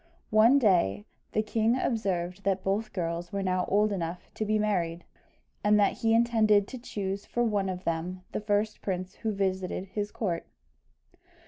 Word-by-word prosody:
One 220 +5 +6
day 170 - +2 0.3
the 215 - +2
king 225 +2 +1
observed 195 -6 -1
that 195 -1 0
both 210 +3 -1
girls 170 -1 -3
were 200 -1 -2
now 185 -1 +1
old 210 +2 +3
enough 175 -2 -4
to 215 - -2
be 215 +1 +2
married, 175 -5 0 0.6
and 210 0 +4
that 200 - +2
he 225 -1 +3
intended 220 -3 +4
to 260 - -7
choose 200 -4 -4
for 240 - 0
one 205 -4 +1
of 185 0 -5
them 175 +3 -3
the - - -3
first 210 +1 0
prince 185 -1 -4
who 220 - -2
visited 190 -1 -2
his 205 +1 -3
court. 180 -7 -2
200 Hz, 165 wpm, -28 LUFS, 185-215 Hz, 0.6 s, One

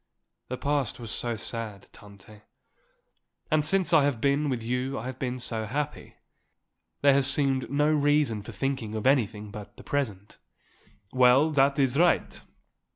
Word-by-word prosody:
"The 130 - -5
past 145 -2 -1
was 115 -3 -7
so 120 +1 -3
sad, 110 -2 -6
Tante, 105 +1 -15 1.1
and 155 -1 +3
since 180 +2 +2
I 155 -3 +6
have 140 -5 0
been 140 +3 +1
with 125 -4 -3
you 125 +3 -2
I 110 - -6
have 130 0 -6
been 125 -1 -3
so 115 -3 -3
happy. 145 +5 -4 0.9
There 140 -1 +5
has 135 -1 +3
seemed 135 -2 +1
no 145 +3 +2
reason 145 -7 +2
for 105 - -9
thinking 115 0 -3
of 110 - -4
anything 105 -6 +1
but 105 0 -10
the - - -12
present." 105 -9 -4 0.7
"Well, 130 +4 +5
that 140 -1 +3
is 135 0 +1
right. 175 0 +2
130 Hz, 155 wpm, -27 LUFS, 110-145 Hz, 1.1 s, I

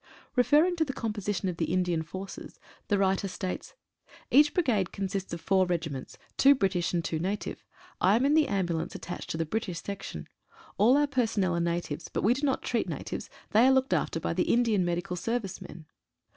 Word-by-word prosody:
Referring 300 +8 +4
to 325 - +3
the 275 -4 -4
composition 205 -4 -2
of 180 -2 -3
the 160 -2 -1
Indian 180 -3 +1
forces, 190 +4 -8 0.3
the 205 - +2
writer 195 0 +1
states: 185 0 -5 0.3
— - - -23
Each 295 +2 +6
brigade 240 - +1
consists 195 -1 -3
of 170 - -5
four 190 -1 +2
regiments, 160 -6 -3 0.2
two 280 +1 +7
Bri 195 -7 +2
tish 175 -2 -1
and 170 -2 -1
two 160 - -1
native. 195 +5 -3 0.4
I 190 +3 +4
am 245 +4 +2
in 285 - +3
the 310 -1 +4
ambulance 175 -5 -1
attached 175 - -6
to - - -2
the 165 - 0
British 185 -1 -3
section. 200 0 -6 0.5
All 240 +6 +6
our 295 - +4
personnel 225 -9 0
are - - 0
natives, 170 -2 -2
but - - -2
we 225 - +5
do 265 - -5
not 270 - 0
treat - - -1
natives. - - -5 0.2
They 225 +4 +6
are - - +6
looked 265 0 +2
after 165 - 0
by - - -2
the 180 +1 +1
Indian 230 -5 +3
Medical 175 +1 -2
Service 210 0 -3
men. 160 -1 -10
195 Hz, 200 wpm, -29 LUFS, 175-240 Hz, 0.5 s, two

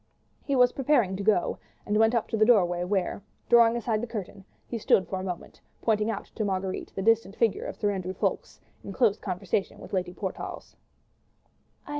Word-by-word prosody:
He 280 - -1
was 250 -1 +5
preparing 250 -8 +2
to 195 - -4
go, 200 -3 +1 0.3
and 210 - -1
went 225 +2 +4
up 230 - 0
to - - -1
the 215 - +3
doorway, 180 -7 +4
where, 190 0 -1 0.3
drawing 235 -1 +6
aside 225 -2 -1
the 240 - -3
curtain, 200 -3 -7 0.2
he 235 - -5
stood 190 -3 +3
for 190 - -3
a - - -5
moment 180 -3 -6 0.2
pointing 215 -1 +1
out 210 -2 -3
to 220 - -2
Marguerite 190 -2 -3
the 195 - -3
distant 225 -2 +2
figure 230 -3 +1
of - - -5
Sir 205 - 0
Andrew 185 -1 -4
Ffoulkes - - -2 0.2
in 195 - -7
close 215 -2 +2
conversation 190 +1 -2
with - - -11
Lady 180 -2 -1
Portarles. 190 +1 -6
205 Hz, 190 wpm, -27 LUFS, 190-225 Hz, 0.3 s, drawing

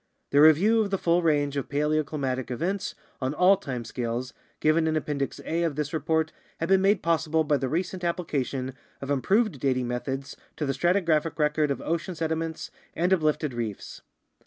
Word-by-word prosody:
The 145 - +5
review 185 +9 +6
of 210 - -1
the 195 - 0
full 170 0 +2
range 145 -3 +1
of 140 - -3
paleoclimatic 145 -3 -1
events 190 - -2 0.3
on 130 +3 -1
all 180 +4 +6
time 130 -10 -5
scales 120 +2 -3 0.3
given 160 +1 +3
in 160 - +1
Appendix 145 -3 -2
A 165 +1 -1
of 165 -4 0
this 150 +1 -3
report 160 0 0 0.3
has 165 - -1
been 190 +1 +4
made 195 0 +3
possible 160 -1 +2
by 150 -1 +2
the 130 -1 -2
recent 180 +4 -2
application 140 -7 -2 0.3
of 135 +1 -4
improved 190 - +2
dating 130 -2 0
methods 135 +3 -4 0.2
to 150 - -2
the 135 - 0
stratigraphic 165 0 +1
record, 150 -1 +2
of 140 - -2
ocean 170 +2 -2
sediments 160 0 -3 0.2
and 180 +3 +2
uplifted 155 -4 +1
reefs. 115 -4 -5
155 Hz, 175 wpm, -26 LUFS, 135-170 Hz, 0.3 s, review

